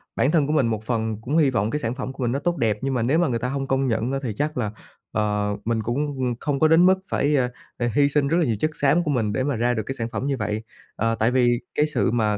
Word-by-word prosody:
bản 140 - +2
thân 155 -5 +3
của 150 - 0
mình 135 -6 +3
một 110 -2 -2
phần 110 -2 -1
cũng 140 +8 -1
hy 145 -4 +5
vọng 105 -4 0
cái 150 - -1
sản 115 -1 -2
phẩm 130 0 -5
của 135 -1 -5
mình 120 - +1
nó 140 - -1
tốt 175 +3 -1
đẹp, 110 -6 +1
nhưng 135 0 -1
mà 125 - 0
nếu 140 +8 +2
mà 175 - +3
người 120 -3 -1
ta 125 - -2
hông 135 0 -3
công 135 0 +1
nhận 115 +2 0
á 135 - -1
thì 115 - -2
chắc 150 +3 -2
là, 110 -5 -1 0.4
ờ, 105 -1 0
mình 115 -1 0
cũng, 125 +7 -1
ừm, 125 -2 -1
không 145 -2 -1
có 155 - +5
đến 165 +3 +5
mức 190 0 +4
phải, 145 +1 +1
a, 125 -1 +1 0.3
à, 120 -1 0
hy 140 -1 +4
sinh 145 -1 +1
rất 165 +4 +2
là 170 - +3
nhiều 115 -5 0
chất 155 - 0
xám 150 +4 +3
của 150 - -1
mình 110 -6 0
để 130 - 0
mà 140 -2 0
ra 120 +2 +1
được 110 - -2
cái 135 - -4
sản 115 -2 -3
phẩm 130 +3 -3
như 135 -2 0
vậy. 105 0 -2 0.3
Ờ, 115 +1 0
tại 115 +2 +1
vì 120 -2 +3 0.2
cái 150 - +3
sự 150 - 0
mà 110 -3 +1
125 Hz, 315 wpm, -23 LUFS, 115-145 Hz, 0.4 s, hy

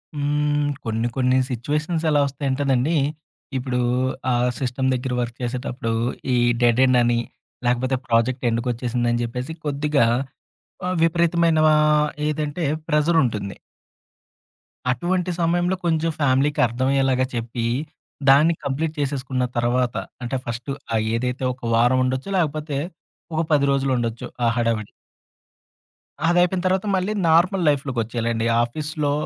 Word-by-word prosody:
హ్మ్. 145 0 0 0.2
కొన్ని 115 +1 -1
కొన్ని 130 0 +3
సిట్యుయేషన్స్ 150 +7 -2
ఎలా 145 -1 +3
వస్తాయంటేనండీ! 135 +1 0 0.6
ఇప్పుడూ 125 -1 -2 0.5
ఆ - - +3 0.3
సిస్టమ్ 130 0 -1
దగ్గర 125 0 -2
వర్క్ 120 0 -4
చేసేటప్పుడూ 125 -1 -3 0.4
ఈ - - +3 0.3
డెడ్ 120 0 +4
ఎండ్ 130 -1 +4
అని 120 0 +2 0.5
లేకపోతే 125 +2 +1
ప్రాజెక్ట్ 120 +3 +1
ఎండ్‌కి 115 +2 -1
ఒచ్చేసిందని 120 0 -1
జెప్పేసి 125 +6 -4
కొద్దిగా 145 -2 +2 0.8
ఆహ్, 185 0 -1
విపరీతమైనా 170 -1 +3
ఆహ్, 150 0 +3 0.2
ఏదంటే 150 +2 -2 0.2
ప్రెజర్ 160 +2 +3
ఉంటుంది. 105 -5 -3 1.3
అటువంటి 180 +8 0
సమయంలో 175 +2 +1
కొంచెం 165 -1 +1
ఫ్యామిలీకి 140 +1 +2
అర్థమయ్యేలాగా 130 +2 +1
చెప్పి 115 0 -3 0.6
దాన్ని 150 +5 +6
కంప్లీట్ 150 +3 -2
చేసేసుకున్న 130 -2 -1
తరువాత 120 +1 +1 0.3
అంటే 125 +2 -2
ఫస్టు 120 +4 -4 0.2
ఆ - - +2 0.2
ఏదైతే 125 +2 -2
ఒక 125 - -19
వారం 120 +3 +4
ఉండొచ్చు 130 +7 -2
లేకపోతే 155 -3 -1 0.6
ఒక 160 - +1
10 145 -2 +4
రోజులుండొచ్చు 125 -4 -1 0.2
ఆ - - +4
హడావిడి. 115 -3 0 1.4
అదయిపోయిన 175 +1 +3
తర్వాత 190 +2 +1
మళ్ళీ 190 +3 0 0.2
నార్మల్ 175 +3 +3
లైఫ్‌లోకొచ్చేయాలండి. 115 -4 -1 0.2
ఆఫీస్‌లో 150 +4 -2
135 Hz, 115 wpm, -22 LUFS, 120-155 Hz, 1.4 s, దాన్ని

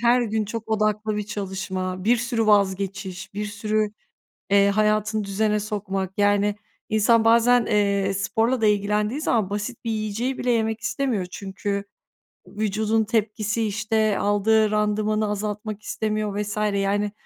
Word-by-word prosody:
her 240 +1 +4
gün 220 -1 -1
çok 220 +2 -6
odaklı 215 0 0
bir 210 - -1
çalışma, 190 -2 -4
bir 235 +3 +4
sürü 230 -1 -1
vazgeçiş, 195 -1 0
bir 210 - -2
sürü, 210 +1 -1 0.6
eee, 200 0 +5
hayatını 215 +1 +1
düzene 210 +2 0
sokmak. 195 -2 -3
Yani, 205 0 +3 0.3
insan 220 +1 +3
bazen, 235 +1 +5
eee, 200 -2 +1
sporla 225 +5 0
da 220 - +3
ilgilendiği 210 +5 +1
zaman 220 -10 +1
basit 210 +4 -4
bir 230 - -2
yiyeceği 220 +4 -2
bile 250 - 0
yemek 225 -1 0
istemiyor 230 -4 -1
çünkü 200 +2 -4 0.6
vücudun 215 +2 0
tepkisi 215 0 -1
işte 215 0 0
aldığı 210 +1 +3
randımanı 215 0 +1
azaltmak 210 +1 -4
istemiyor 215 -2 -2
vs. 210 0 -4 0.2
yani, 200 +1 0
210 Hz, 135 wpm, -24 LUFS, 200-220 Hz, 0.6 s, eee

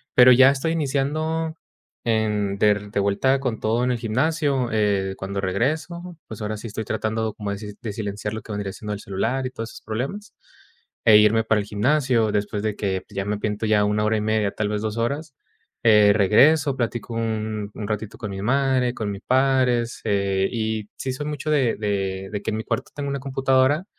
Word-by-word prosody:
Pero 125 0 +8
ya 130 +2 +8
estoy 140 +4 -1
iniciando 155 +2 -1 0.5
de 105 -2 +1
de - - +1
vuelta 115 +7 +2
con 125 -5 -2
todo 115 +3 0
en 125 - +1
el 125 - 0
gimnasio, 135 +2 0
eh, 100 -3 +1
cuando 100 +1 -4
regreso, 160 - -2
pues, 110 -1 -8
ahora 110 0 -2
sí 115 - -7
estoy 110 +1 -5
tratando 110 0 -2
como 105 -2 -5
de 105 +2 -7
silenciar 105 0 -4
lo 110 - -5
que - - -10
vendría 100 -1 -3
siendo 105 -1 -5
el 100 - -5
celular 115 +7 -2
y 130 - -1
todos 115 -2 -6
esos - - -12
problemas, 135 - -4 0.7
e 110 -2 +8
irme 110 +1 +4
para 110 -1 +2
el 100 - -8
gimnasio. 120 0 +2
Después 105 0 -2
de 110 -1 -1
que, 95 -2 -1
pues, - - -20
ya 95 0 -2
me 105 0 -1
pinto 105 +1 -2
ya 105 -1 +3
1 105 +1 +1
hora 110 - +2
y - - -1
media, 110 -1 +1
tal 105 0 -2
vez 105 0 -2
2 110 -1 -3
horas, 140 +5 -2 0.5
eh 105 -2 +6
regreso, 135 +8 +4
platico 120 -1 -3
un 110 -2 -2
un 105 - -6
ratito 105 0 -4
con 110 -3 -5
mi 95 - -5
madre, 130 0 +2
con 105 -4 -3
mi 100 - -6
padre. 130 0 +2 0.2
E,h, 100 -1 +1
y 110 -2 -2
sí 130 - -3
soy 145 +3 -5
mucho 150 0 -3
de 135 -6 +2
de 95 -2 -2
de 105 - -3
que - - -2
en 110 - -2
mi 110 - -4
cuarto - - -2
tengo 145 -1 -3
una 140 0 -2
computadora 135 +3 +2
110 Hz, 205 wpm, -23 LUFS, 105-130 Hz, 0.7 s, Pero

